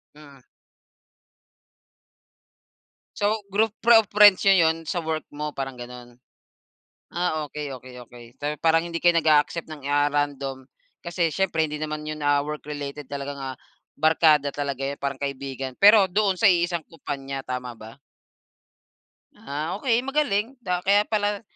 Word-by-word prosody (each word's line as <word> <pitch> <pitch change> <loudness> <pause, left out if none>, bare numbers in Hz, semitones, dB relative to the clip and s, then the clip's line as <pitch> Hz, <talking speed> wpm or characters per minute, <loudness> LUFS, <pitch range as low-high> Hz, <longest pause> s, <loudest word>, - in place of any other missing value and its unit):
Mm. 140 -4 -16 2.7
So, 205 0 -1
group 220 +2 +3
pro 235 -1 +6
of 210 - -17
friends 205 -2 +7
n'yo 190 -4 +5
yun 160 -1 -2
sa - - -2
work 160 -2 -3
mo, 150 0 -5
parang 135 -2 -5
gano'n? 120 0 -11 0.9
Ah, 170 -3 -1
okey 145 -2 -5
okey 125 0 -12
okey. 120 0 -14
So, 150 +1 -2
parang 165 +1 +3
hindi 170 -1 -5
kayo 175 -1 +5
nag-a-accept 155 +1 +2
ng 155 -2 -10
ah, 145 0 +3
random 140 -2 -3 0.3
kasi 170 -2 -1
siyempre 175 -5 +1
hindi 150 0 -6
naman 155 0 -4
yun 155 -1 -5
ah, 145 0 +2
work 150 0 -5
related 145 -1 -7
talagang 140 0 -5
ah, 130 -2 -6 0.4
barkada 155 -2 +3
talaga 140 -2 -3
yan, 140 +1 -5
parang 140 -1 -2
kaibigan. 135 -1 -5
Pero 205 -1 +8
doon 195 0 0
sa 225 - +4
iisang 175 -3 +2
kumpanya, 135 -4 -6
tama 125 -1 -5
ba? 110 +2 -13 1.4
Ah 150 +3 -4
okey, 245 -1 +1
magaling. 270 -5 0
Da 180 -4 -2
kaya 200 +1 +5
pala 205 -1 0
150 Hz, 150 wpm, -24 LUFS, 140-180 Hz, 2.7 s, Pero